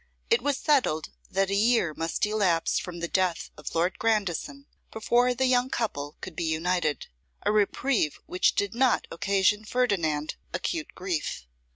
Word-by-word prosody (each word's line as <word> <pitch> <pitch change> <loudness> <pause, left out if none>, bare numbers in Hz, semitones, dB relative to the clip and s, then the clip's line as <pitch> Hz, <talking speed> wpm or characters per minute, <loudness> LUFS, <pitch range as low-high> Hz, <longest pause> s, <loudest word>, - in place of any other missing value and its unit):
IT 460 - +4
WAS 285 -1 0
settled 255 - +1 0.2
that 195 0 0
a - - +2
year 215 -6 +3
must 165 +5 -1
elapse 195 -6 +1
from 175 -1 -7
the 170 - -1
death 185 -2 0
of - - -8
Lord 175 +3 +1
Grandison 220 - -1 0.3
before 240 +3 +2
the 260 +2 +1
young 255 0 +3
couple 150 - -3
could 180 - -7
be 170 - -2
united: 160 -1 0 0.4
a - - +3
reprieve 210 - +1
which 180 - +2
did 200 +1 0
not 250 +1 +2
occasion 200 +3 +2
Ferdinand 175 -11 0 0.2
acute 325 -3 -3
grief. 175 - -3
200 Hz, 155 wpm, -27 LUFS, 170-240 Hz, 0.4 s, IT